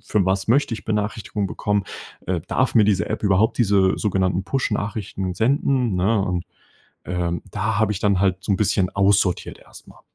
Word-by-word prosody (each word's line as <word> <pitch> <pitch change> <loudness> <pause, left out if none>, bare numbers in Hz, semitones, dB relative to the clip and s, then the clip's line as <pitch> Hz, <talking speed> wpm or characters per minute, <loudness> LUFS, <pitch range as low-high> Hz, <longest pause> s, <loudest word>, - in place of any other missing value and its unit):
für 105 -3 0
was 95 0 0
möchte 125 +2 +2
ich - - -9
Benachrichtigungen 105 -1 -2
bekommen, 105 -1 -1 0.4
äh, 90 -2 -1
darf 130 -1 0
mir 110 - +6
diese 100 -2 +1
App - - -3
überhaupt 105 +5 +2
diese 100 -4 +3
sogenannten 95 -2 0
Push-Nachrichten 105 -6 -2
senden, 125 -2 +1
ne? 100 +4 +2
Und, 90 -3 -2 0.6
ähm, 85 -1 -2
da 105 0 -1
habe 110 -1 +2
ich 100 - -3
dann 100 -2 +2
halt 95 -2 +2
so 100 +1 -1
'n - - +2
bisschen 95 -2 +1
aussortiert 100 -2 +1
erstmal. - - -16
100 Hz, 170 wpm, -22 LUFS, 95-110 Hz, 0.6 s, mir